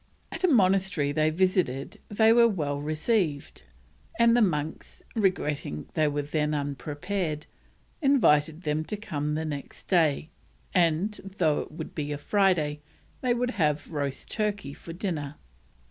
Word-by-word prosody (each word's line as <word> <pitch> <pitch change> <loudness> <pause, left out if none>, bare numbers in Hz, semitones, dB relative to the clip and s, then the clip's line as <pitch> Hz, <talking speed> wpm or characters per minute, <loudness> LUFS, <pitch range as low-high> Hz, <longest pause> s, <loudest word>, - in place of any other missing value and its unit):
At - - -6
a - - +6
monastery 190 - +3
they 155 +1 +2
visited 170 -6 0
they 220 +2 +5
were 235 0 +6
well 150 -9 -1
received, 155 - -1 0.6
and 235 0 +5
the 240 - +4
monks, 155 -6 -2
regretting 150 - -1
they 155 -1 +2
were 145 0 -1
then 150 +1 0
unprepared, 150 +3 -3 0.6
invited 165 - +3
them 150 +1 0
to 210 - -4
come 150 -8 -3
the 160 +1 -2
next 145 -3 -7
day 160 -6 +3 0.5
and, 175 +4 +2 0.2
though 155 -4 +2
it - - -6
would - - -7
be 150 -1 -3
Friday, 155 -3 +1 0.4
they 250 -2 +2
would 245 +1 0
have 150 0 +1
roast 140 -3 -3
turkey 205 -9 -2
for 165 - -10
dinner. 165 -5 -3
155 Hz, 140 wpm, -27 LUFS, 150-200 Hz, 0.6 s, a